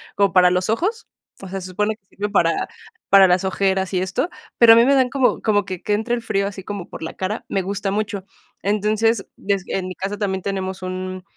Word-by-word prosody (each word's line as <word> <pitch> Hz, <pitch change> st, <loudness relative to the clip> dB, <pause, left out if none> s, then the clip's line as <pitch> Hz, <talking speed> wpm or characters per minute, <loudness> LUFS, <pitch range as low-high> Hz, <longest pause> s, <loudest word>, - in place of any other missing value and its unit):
como 200 Hz, -3 st, +3 dB
para 180 Hz, 0 st, +5 dB
los 180 Hz, +2 st, 0 dB
ojos, 410 Hz, -, -1 dB, 0.3 s
o 190 Hz, -, -8 dB
sea, 195 Hz, 0 st, -4 dB
se 185 Hz, -, -8 dB
supone 210 Hz, +3 st, -1 dB
que 195 Hz, -, -43 dB
sirve 205 Hz, +1 st, -2 dB
para 170 Hz, -5 st, +1 dB, 0.4 s
para 195 Hz, -1 st, +8 dB
las 180 Hz, +1 st, +2 dB
ojeras 190 Hz, 0 st, 0 dB
y -, -, +2 dB
esto, 225 Hz, -, -1 dB, 0.3 s
pero, 230 Hz, -1 st, +9 dB
a -, -, +7 dB
mí 235 Hz, +1 st, +6 dB
me 280 Hz, -, +4 dB
dan 260 Hz, -2 st, +3 dB
como 265 Hz, -2 st, +1 dB
como 205 Hz, -2 st, +2 dB
que 185 Hz, -3 st, -6 dB
que 210 Hz, -, -1 dB
entre 220 Hz, +3 st, 0 dB
el 235 Hz, -, -4 dB
frío 195 Hz, -3 st, 0 dB
así 195 Hz, -1 st, -7 dB
como 200 Hz, -3 st, -6 dB
por -, -, -9 dB
la 160 Hz, -, -5 dB
cara, 200 Hz, +4 st, -3 dB
me 195 Hz, -, 0 dB
gusta 200 Hz, +1 st, -2 dB
mucho. 205 Hz, -2 st, -2 dB, 0.4 s
Entonces, 215 Hz, +1 st, +1 dB
yo 200 Hz, 0 st, 0 dB
s 190 Hz, -, -7 dB
en 185 Hz, -1 st, -2 dB
mi 185 Hz, -, -6 dB
casa 200 Hz, +2 st, -4 dB
también 190 Hz, -3 st, -2 dB
tenemos 190 Hz, -1 st, -3 dB
un, 185 Hz, 0 st, -5 dB
195 Hz, 240 wpm, -21 LUFS, 185-215 Hz, 0.4 s, pero